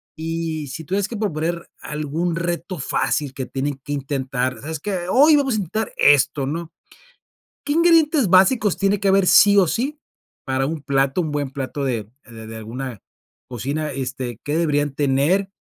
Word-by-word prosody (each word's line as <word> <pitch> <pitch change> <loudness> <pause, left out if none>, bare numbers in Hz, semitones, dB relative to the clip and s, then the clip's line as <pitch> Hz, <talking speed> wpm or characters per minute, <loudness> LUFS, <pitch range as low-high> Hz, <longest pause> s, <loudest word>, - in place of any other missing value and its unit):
Y 160 -1 -3
si 145 +5 -7
tuvieras 195 +5 -1
que 230 - -6
proponer 170 -4 -2
algún 155 +3 -2
reto 170 +1 -3
fácil 140 +1 -1
que 130 -2 -4
tienen 140 +1 -3
que 145 - -4
intentar: 130 -2 -2
"Sabes 155 +2 -5
qué? 180 0 -3
Hoy 295 +6 +6
vamos 270 -3 +1
a - - 0
intentar 210 +3 -3
esto", 140 -1 +4
¿no? 165 +2 -4 0.9
¿Qué 290 - -1
ingredientes 325 - +4
básicos 195 +3 +4
tiene 200 0 +2
que 200 - +1
haber 195 -1 +4
sí 205 +2 +6
o 185 - +5
sí 270 - -2 0.5
para 130 0 0
un 160 +1 -3
plato, 135 +3 +1
un 155 -2 -4
buen 145 -2 -2
plato 135 +1 -4
de 120 -5 -1 0.2
de 115 - -16
de 110 -1 -10
de 115 - -8
alguna 115 +1 -6 0.5
cocina, 140 +6 -3
este, 130 -3 -4
¿qué 145 +2 -1
deberían 145 -4 0
tener? 150 +8 +1
155 Hz, 175 wpm, -21 LUFS, 135-190 Hz, 0.9 s, Hoy